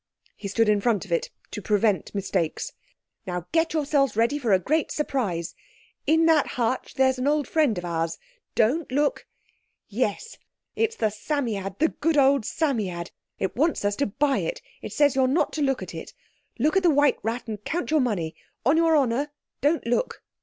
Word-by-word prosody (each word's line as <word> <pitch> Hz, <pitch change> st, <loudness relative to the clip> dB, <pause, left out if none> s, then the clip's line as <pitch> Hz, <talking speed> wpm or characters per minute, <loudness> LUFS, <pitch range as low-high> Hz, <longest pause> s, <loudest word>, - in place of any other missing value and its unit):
He 200 Hz, -, -6 dB
stood 225 Hz, +3 st, +2 dB
in 210 Hz, -1 st, +3 dB
front 210 Hz, -3 st, +1 dB
of 185 Hz, -, -14 dB
it 170 Hz, -, 0 dB, 0.2 s
to 210 Hz, -, -5 dB
prevent 210 Hz, 0 st, +1 dB
mistakes. 190 Hz, -4 st, -2 dB, 0.5 s
"Now 180 Hz, -1 st, -3 dB
get 325 Hz, 0 st, +2 dB
yourselves 285 Hz, -4 st, +1 dB
ready 235 Hz, +6 st, +2 dB
for 240 Hz, -6 st, 0 dB
a 190 Hz, -, +6 dB
great 305 Hz, -, 0 dB
surprise. 200 Hz, -, -2 dB, 0.5 s
In 320 Hz, +1 st, +4 dB
that 320 Hz, -2 st, +4 dB
hutch 250 Hz, +1 st, -1 dB
there's 260 Hz, -1 st, +3 dB
an 255 Hz, -, 0 dB
old 295 Hz, -2 st, +1 dB
friend 295 Hz, -, +2 dB
of 180 Hz, -, -4 dB
ours—don't 230 Hz, -, -2 dB
look!—Yes; 260 Hz, -, -3 dB, 0.4 s
it's 455 Hz, 0 st, 0 dB
the 215 Hz, -2 st, 0 dB
Psammead, 210 Hz, -5 st, -3 dB
the 320 Hz, -, +3 dB
good 320 Hz, 0 st, 0 dB
old 275 Hz, -4 st, +4 dB
Psammead! 210 Hz, -, -1 dB, 0.3 s
it 190 Hz, -, -2 dB
wants 305 Hz, -4 st, +1 dB
us 205 Hz, 0 st, +1 dB
to 280 Hz, -, +1 dB
buy 275 Hz, +7 st, +1 dB
it. -, -, -3 dB, 0.2 s
It -, -, -7 dB
says 290 Hz, -2 st, +3 dB
you're 265 Hz, -1 st, +3 dB
not 280 Hz, +6 st, +1 dB
to 310 Hz, -, -2 dB
look 270 Hz, -2 st, +1 dB
at -, -, -8 dB
it. -, -, -8 dB, 0.4 s
Look 300 Hz, +8 st, +1 dB
at 385 Hz, -, +4 dB
the 355 Hz, -, +4 dB
white 290 Hz, -2 st, +3 dB
rat 230 Hz, +2 st, -3 dB
and 210 Hz, -2 st, -6 dB
count 345 Hz, +5 st, -2 dB
your 310 Hz, -2 st, +4 dB
money! 185 Hz, -10 st, -1 dB, 0.3 s
On 280 Hz, +6 st, +4 dB
your 325 Hz, -1 st, +4 dB
honour 275 Hz, +1 st, +1 dB, 0.3 s
don't 300 Hz, +4 st, +2 dB
look!" 240 Hz, -, -1 dB
260 Hz, 180 wpm, -25 LUFS, 210-300 Hz, 0.5 s, a